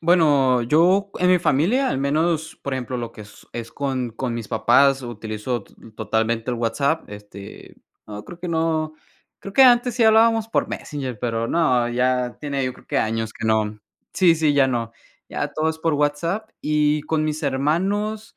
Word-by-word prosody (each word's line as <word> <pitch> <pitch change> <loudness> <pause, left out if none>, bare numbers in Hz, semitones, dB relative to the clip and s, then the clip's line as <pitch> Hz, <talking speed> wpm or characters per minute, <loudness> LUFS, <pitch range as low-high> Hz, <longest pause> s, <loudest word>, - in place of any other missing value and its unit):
Bueno, 145 -7 +3
yo 180 +10 +3
en 180 0 +2
mi 180 - +5
familia, 180 - +2
al 135 - -1
menos, 160 +3 0
por 140 - -4
ejemplo, 130 0 -4
lo 115 -1 -5
que 105 - -10 0.3
es 115 -1 -7
con 130 -4 -2
con 120 +1 -4
mis 115 -3 -6
papás 135 +4 +3
utilizo 110 -1 -5
t - - -23 0.2
totalmente 115 +2 -1
el 120 - -2
WhatsApp, 140 +7 0
este, 105 -1 -11 0.3
no 105 0 -8
creo 175 - -11
que 175 0 -6
no. 160 -1 -1 0.5
Creo 195 - -8
que 270 - +7
antes 245 -2 +5
sí 240 - +1
hablábamos 225 0 +4
por - - 0
Messenger, 130 -7 -5
pero 115 -1 -2
no, 125 -8 +2
ya 125 0 0
tiene, 140 -2 -2
yo 125 - -2
creo - - -19
que - - 0
años 110 0 -2
que 110 - -5
no, 110 -1 0 0.3
sí, 175 -3 +4
sí, 155 -2 +2
ya 140 -2 +4
no. 115 -3 -2 0.4
Ya - - -2
todo 160 +1 0
es 160 - -8
por 160 -1 0
WhatsApp 165 +9 -1
y 150 0 +1
con 155 0 -1
mis 155 +1 -3
hermanos, 195 - -1
140 Hz, 185 wpm, -22 LUFS, 120-165 Hz, 0.5 s, que